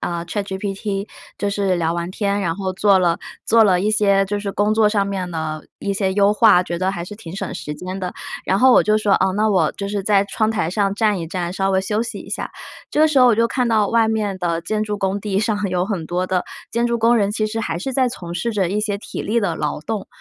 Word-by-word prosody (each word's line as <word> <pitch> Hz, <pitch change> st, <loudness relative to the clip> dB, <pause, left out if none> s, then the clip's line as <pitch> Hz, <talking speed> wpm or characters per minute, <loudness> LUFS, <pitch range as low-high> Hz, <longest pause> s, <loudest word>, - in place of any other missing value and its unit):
呃 170 Hz, -1 st, -3 dB
，ChatGPT 195 Hz, +2 st, -3 dB, 0.3 s
就 205 Hz, -, -1 dB
是 200 Hz, -2 st, 0 dB
聊 165 Hz, -1 st, 0 dB
完 170 Hz, +1 st, -3 dB
天， 200 Hz, +1 st, -1 dB
然 170 Hz, -2 st, -1 dB
后 190 Hz, -2 st, -2 dB
做 195 Hz, +1 st, +4 dB
了 175 Hz, -2 st, +2 dB, 0.3 s
做 225 Hz, 0 st, +5 dB
了 185 Hz, -4 st, +4 dB
一 210 Hz, +3 st, +1 dB
些 200 Hz, -2 st, +3 dB
就 205 Hz, +1 st, -3 dB
是 200 Hz, -, -3 dB
工 205 Hz, +2 st, +1 dB
作 215 Hz, -1 st, +4 dB
上 205 Hz, -2 st, +1 dB
面 190 Hz, -3 st, -3 dB
的 155 Hz, -2 st, -4 dB
一 200 Hz, -, -1 dB
些 190 Hz, -1 st, -1 dB
优 200 Hz, 0 st, +4 dB
化， 210 Hz, -4 st, +5 dB
觉 170 Hz, -1 st, -4 dB
得 190 Hz, +1 st, 0 dB
还 175 Hz, -3 st, -5 dB
是 210 Hz, -, -9 dB
挺 185 Hz, -4 st, -9 dB
省 -, -, -4 dB
时 150 Hz, -4 st, -5 dB
间 185 Hz, +4 st, -6 dB
的。 180 Hz, -1 st, -4 dB, 0.3 s
然 190 Hz, -, +2 dB
后 260 Hz, 0 st, +6 dB
我 -, -, +6 dB
就 215 Hz, +1 st, +2 dB
说， 210 Hz, -2 st, +1 dB
哦， 190 Hz, 0 st, +2 dB
那 215 Hz, +1 st, +2 dB
我 190 Hz, -, +3 dB
就 200 Hz, -, -5 dB
是 200 Hz, 0 st, -2 dB
在 200 Hz, 0 st, +3 dB
窗 215 Hz, +2 st, 0 dB
台 190 Hz, -7 st, -1 dB
上 195 Hz, 0 st, 0 dB
站 210 Hz, -2 st, +1 dB
一 165 Hz, -, -4 dB
站， 175 Hz, +1 st, -3 dB
稍 195 Hz, 0 st, 0 dB
微 190 Hz, -1 st, +2 dB
休 210 Hz, +3 st, -1 dB
息 235 Hz, -, -5 dB
一 -, -, -11 dB
下。 -, -, -4 dB, 0.4 s
这 -, -, -2 dB
个 310 Hz, -, +7 dB
时 305 Hz, -3 st, +2 dB
候 255 Hz, -, +7 dB
我 235 Hz, -, +5 dB
就 230 Hz, +1 st, +3 dB
看 245 Hz, 0 st, 0 dB
到 215 Hz, -3 st, +2 dB
外 230 Hz, -1 st, +3 dB
面 210 Hz, -3 st, -1 dB
的 170 Hz, -2 st, -1 dB
建 215 Hz, +4 st, -1 dB
筑 210 Hz, -1 st, -2 dB
工 195 Hz, 0 st, -1 dB
地 200 Hz, -2 st, -1 dB
上 210 Hz, -1 st, 0 dB
有 180 Hz, 0 st, 0 dB
很 190 Hz, -6 st, -3 dB
多 180 Hz, +2 st, -1 dB
的 185 Hz, -1 st, 0 dB, 0.3 s
建 235 Hz, +1 st, +1 dB
筑 235 Hz, 0 st, 0 dB
工 230 Hz, +1 st, +3 dB
人， 205 Hz, -3 st, +2 dB
其 215 Hz, +1 st, -1 dB
实 225 Hz, +1 st, -3 dB
还 170 Hz, -6 st, -2 dB
是 265 Hz, +9 st, -4 dB
在 260 Hz, -1 st, +2 dB
从 175 Hz, -8 st, -7 dB
事 180 Hz, +7 st, -1 dB
着 195 Hz, -5 st, 0 dB
一 210 Hz, -, 0 dB
些 210 Hz, -1 st, -1 dB
体 200 Hz, -, -7 dB
力 235 Hz, +3 st, 0 dB
的 185 Hz, -5 st, 0 dB
劳 150 Hz, 0 st, -2 dB
动。 215 Hz, +1 st, -4 dB
200 Hz, 305 characters per minute, -20 LUFS, 185-215 Hz, 0.4 s, 个